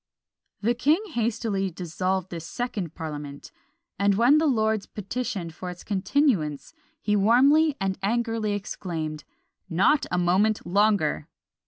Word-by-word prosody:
The 230 +3 +2
king 285 +8 +2
hastily 220 -5 -1
dissolved 185 +2 -3
this 165 -2 -6
second 205 -9 -4
parliament; 145 -3 -7 0.5
and 200 0 +3
when 245 +8 +5
the 320 - +2
lords 220 -5 +1
petitioned 200 -5 -4
for 180 +3 -7
its 180 0 -9
continuance, 195 - 0 0.3
he 210 -7 0
warmly 275 +9 +4
and 195 -1 -2
angrily 225 0 0
exclaimed, 165 -6 -5 0.4
"Not 190 - +3
a 180 - 0
moment 190 +5 +2
longer!" 190 -5 +2
200 Hz, 125 wpm, -25 LUFS, 175-235 Hz, 0.5 s, when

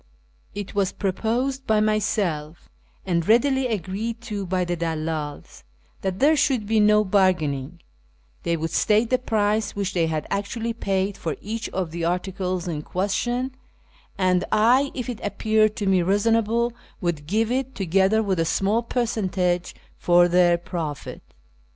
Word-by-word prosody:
It 205 -1 -5
was 200 -2 +1
proposed 240 +7 -1
by 220 -1 +3
myself, 200 -7 -1 0.4
and 170 -3 0
readily 265 +4 +3
agreed 220 +2 -3
to 205 -4 -5
by 180 0 0
the 175 0 -1
dalldls, 160 -3 -4 0.4
that 190 -1 -2
there 295 +6 +4
should 260 -6 +1
be 220 +1 +2
no 210 0 +5
bargaining: 175 -6 +1 0.6
they 170 0 0
would 160 0 -3
state 215 +6 +2
the 255 - +3
price 215 -3 0
which 200 -1 -2
they 170 -2 +1
had 155 -2 -2
actually 230 +3 -2
paid 195 -2 -1
for 160 - -3
each 225 +2 -5
of 180 -4 -3
the 170 0 -4
articles 180 +1 -2
in 155 -4 -3
question, 240 - -1 0.6
and 185 -1 +2
I, 245 +6 +4
if 250 -3 -4
it 245 -3 -5
appeared 215 +1 +1
to 205 - -3
me 190 -2 +3
reasonable, 225 +5 +1 0.3
would 165 -5 -2
give 220 +5 +1
it, 265 +1 -2
together 195 +4 +2
with 190 -4 0
a - - +3
small 200 +7 +1
per 240 +1 -1
centage 185 -5 -1 0.2
for 175 0 +5
their 175 -1 +4
profit. 165 -4 -5
200 Hz, 150 wpm, -24 LUFS, 175-225 Hz, 0.6 s, no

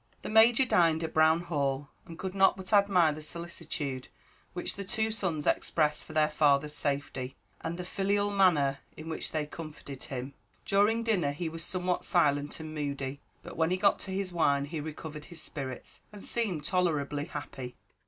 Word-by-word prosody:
The - - -4
Major 225 +4 +6
dined 165 -7 +3
at 160 - -4
Brown 160 +1 +5
Hall, 140 -4 -1 0.2
and 165 - -9
could 190 +1 -4
not 195 0 +4
but 190 +2 -6
admire 195 -5 +5
the 155 +1 -6
solicitude 150 -5 -4 0.5
which 175 - -1
the 200 - -4
two 220 +2 0
sons 180 -8 -1
expressed 150 -2 +1
for - - -10
their 155 -1 +4
father's 150 -1 +3
safety, 140 -3 -2 0.3
and 170 - -3
the 180 - -5
filial 200 +2 0
manner 155 -9 +3 0.2
in 155 +1 -7
which 160 - -1
they 155 -2 -1
comforted 150 -3 -9
him. 130 +1 -5 0.3
During 210 +3 +3
dinner 180 -11 +1
he 160 +3 -3
was 165 +1 -5
somewhat 180 0 -1
silent 145 -4 +2
and 155 -1 -7
moody; 140 -2 -3 0.2
but - - -9
when 160 0 +2
he 185 - +1
got 200 +2 +3
to 190 - -5
his 190 -1 -2
wine 140 -4 +2
he 155 +2 -5
recovered 150 0 -7
his 170 -2 -7
spirits, 135 -3 -6
and 205 -2 -11
seemed 200 -10 -1
tolerably 150 -5 0
happy. 135 -6 -7
160 Hz, 180 wpm, -30 LUFS, 145-185 Hz, 0.5 s, Major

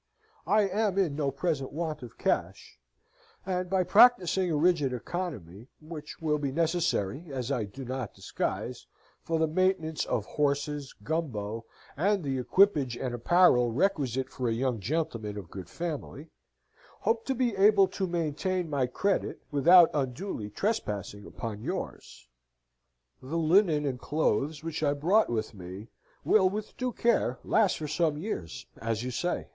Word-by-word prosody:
I 210 +1 +4
am 200 0 0
in 175 -8 +1
no 145 -2 0
present 135 0 -2
want 155 0 -3
of 120 -2 -11
cash, - - -2 0.7
and 180 -1 -2
by 190 0 +2
practising 190 -2 +5
a 160 - 0
rigid 150 -5 +2
economy, 120 - -5
which 155 -1 -9
will 150 -2 0
be 140 -2 -2
necessary 165 - 0
(as 130 -1 -3
I 120 -6 0
do 130 +7 -9
not 130 -3 -5
disguise) - - -4 0.3
for 165 - -1
the 160 - +3
maintenance 160 -1 0
of 105 - -1
horses, 145 0 -1
Gumbo, 115 -7 -3 0.3
and 195 +4 +1
the 135 -2 -1
equipage 145 - +3
and 125 -1 -3
apparel 125 -2 +4
requisite 135 - 0
for 125 -3 -2
a - - +1
young 125 0 -1
gentleman 115 - -2
of 95 -5 -8
good 95 -3 -8
family, 160 -2 -6 0.7
hope 225 0 +1
to 265 - 0
be 240 -3 0
able 200 0 +5
to 190 - -2
maintain 170 +1 -1
my 135 -3 +1
credit 195 +10 -1
without 170 +4 +7
unduly 130 - -3
trespassing 105 - -3
upon 110 -2 -6
yours. 60 - -6 0.9
The 140 +6 -4
linnen 165 -2 +3
and 130 -3 -2
clothes 150 +1 0
which 165 -2 -4
I 145 -2 +2
brought 185 +10 +3
with 110 -2 -2
me 95 +3 -9 0.4
will 190 -3 +5
with 210 +2 -5
due 255 -1 -2
care 230 - +1
last 210 -4 +2
for 155 - -4
some 155 0 0
years 150 - -5 0.2
as 115 0 -2
you 125 - -3
say. 175 +9 -2
150 Hz, 150 wpm, -29 LUFS, 125-180 Hz, 0.9 s, without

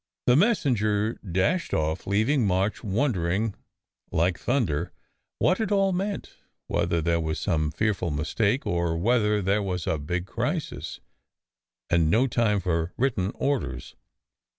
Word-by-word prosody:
The 125 - +5
messenger 115 - +2
dashed 95 - 0
off, 80 0 -1
leaving 110 +5 +2
March 95 +4 0
wondering 105 - 0 0.6
like 85 +2 +1
thunder 115 - 0 0.4
what 185 +5 +2
it 220 -3 -1
all 195 -1 +3
meant: 195 +2 -3 0.3
whether 85 - 0
there 85 0 +2
was 80 -1 -2
some 75 -1 0
fearful 90 +1 -1
mistake, 100 - 0
or 85 -1 0
whether 105 +1 +2
there 100 +3 +2
was 90 -4 -3
a 80 - 0
big 90 +5 -3
crisis, - - -3 0.9
and 85 -2 +3
no 115 +10 +4
time 115 -5 +1
for 85 -2 -1
written 110 -7 0
orders. 140 0 -2
100 Hz, 130 wpm, -26 LUFS, 85-125 Hz, 0.9 s, The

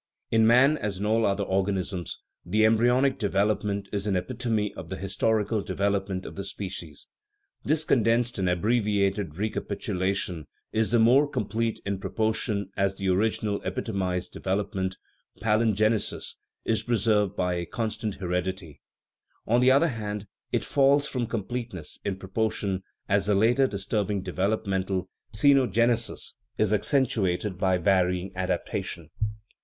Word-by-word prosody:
In 110 -1 +5
man, 135 +6 +5
as 100 -3 -3
in 100 - -3
all 110 +1 +3
other 100 +1 0
organisms, 95 -2 -1
" - - -59
the 105 +5 +2
embryonic 120 +5 +3
development 100 -1 0
is 100 0 -2
an 100 - +1
epitome 105 +3 -1
of 80 - -9
the 95 - -3
his 95 0 -6
torical 110 0 +1
development 95 0 -1
of - - -7
the 100 - -4
species. 90 -6 -7 0.6
This 155 +1 +2
condensed 115 -2 +2
and 90 -1 +1
abbreviated 100 -3 +1
recapitulation 95 -5 -2 0.2
is 110 0 +1
the 120 - +3
more 130 +6 +5
complete 115 -2 -1
in 100 -1 -2
proportion 110 -1 -1
as 100 0 +1
the 95 -1 -2
original 105 +1 +1
epitomized 95 -7 -2
development 95 -1 -2 0.4
(palingenesis) 110 0 +1 0.3
is 110 - +1
preserved 105 -4 +1
by 90 -2 0
a 85 -1 -3
constant 110 -1 -3
heredity; 90 -4 -3 0.6
on 120 +2 +3
the 125 +1 +5
other 140 +6 +5
hand, 105 -4 -4 0.3
it - - 0
falls 140 0 +3
off - - -6
from 125 -3 -1
completeness 115 -6 -5
in 100 -2 -1
proportion 95 -1 -2 0.3
as 100 0 +2
the 105 - +3
later 120 +6 +4
disturbing 100 -1 -2
development 95 +1 -1 0.4
(ceno 130 +1 +4
genesis) 115 +2 +1 0.2
is 110 -1 +2
accentuated 105 - +1
by 95 -1 +3
varying 90 0 +1
adaptation." 90 -3 -3
105 Hz, 140 wpm, -27 LUFS, 95-115 Hz, 0.6 s, In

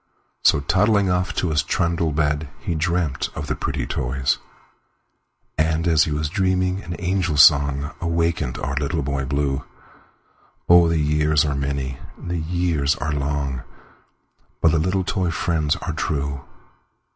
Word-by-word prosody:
So, 70 - +4
toddling 95 +5 +2
off 90 +1 0
to 85 - 0
his 75 - +2
trundle 85 -1 0
bed, 75 0 0
He - - -3
dreamt 80 -2 -1
of 70 - -4
the - - -2
pretty 70 -3 -3
toys; 65 +2 -1 1.2
And, 80 +2 +1
as 80 -2 +4
he 80 - -3
was 75 +1 -1
dreaming, 95 +2 0
an 85 -1 -6
angel 90 -3 -1
songAwakened 75 +2 +3
our 70 +1 -2
Little 75 +1 -1
Boy 70 -1 -2
Blue—Oh! 70 +4 -1
the 85 0 +1
years 75 0 +2
are 70 - 0
many, 70 -2 -3 0.2
the 85 -1 -4
years 80 -3 0
are 75 -1 -3
long, 70 -2 -2 1.0
But 80 - +4
the 80 - +2
little 95 +4 0
toy 90 -1 -1
friends 80 -3 0
are - - -5
true! 70 -2 -3
75 Hz, 140 wpm, -22 LUFS, 70-85 Hz, 1.2 s, So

